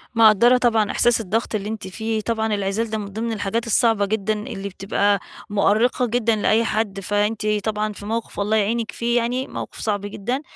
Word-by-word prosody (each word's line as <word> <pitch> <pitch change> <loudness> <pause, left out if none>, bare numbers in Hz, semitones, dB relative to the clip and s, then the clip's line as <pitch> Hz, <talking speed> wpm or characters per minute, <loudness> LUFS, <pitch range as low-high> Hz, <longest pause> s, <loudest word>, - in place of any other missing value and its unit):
مقدرة 230 +2 +6
طبعًا 225 -4 +2
إحساس 240 -1 +3
الضغط 220 +3 -2
اللي 205 0 -3
أنتِ 220 -4 -5
فيه، 220 +3 -3
طبعًا 220 -1 -1
العزال 200 +3 -1
ده 220 - -2
من 210 - -4
ضمن 220 +4 -4
الحاجات 225 +2 -2
الصعبة 225 -2 +3
جدًا 215 +1 0
اللي 195 +1 -5
بتبقى 200 +1 +1 0.3
مؤرقة 215 +5 +2
جدًا 230 -1 +1
لأي 215 +2 +2
حد، 210 -3 -1
فأنتِ 205 +2 -1 0.2
طبعًا 215 -1 -1
في 205 - -10
موقف 225 +1 -4
والله 205 +2 +1
يعينك 225 +2 0
فيه 235 +1 0
يعني، 245 +3 -1
موقف - - -7
صعب 205 -2 -1
جدًا. 210 +6 -3
220 Hz, 180 wpm, -22 LUFS, 205-230 Hz, 0.3 s, مقدرة